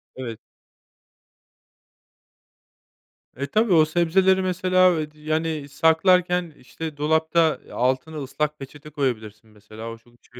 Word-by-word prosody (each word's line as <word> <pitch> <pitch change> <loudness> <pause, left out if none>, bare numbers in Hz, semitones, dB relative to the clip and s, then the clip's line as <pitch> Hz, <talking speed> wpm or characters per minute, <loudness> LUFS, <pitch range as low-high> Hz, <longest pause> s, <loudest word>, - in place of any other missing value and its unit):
Evet. 120 -4 -6 3.0
E, 140 +2 -4
tabii, 215 +4 +2
o 155 -2 +6
sebzeleri, 185 +4 +2
mesela, 185 -1 +2
eee, 150 -1 -4
d 155 - -23
yani, 155 -1 -2
saklarken, 175 +2 +2
işte, 155 +3 -8
dolapta, 160 +1 +2
eee, - - -16
altına 130 +6 -1
ıslak 150 +2 -3
peçete 145 +2 -11
koyabilirsin 110 -7 -4
mesela, 110 +2 -10
o 115 - -9
çok 120 +1 -25
işe 125 0 -15
155 Hz, 120 wpm, -23 LUFS, 130-170 Hz, 3.0 s, o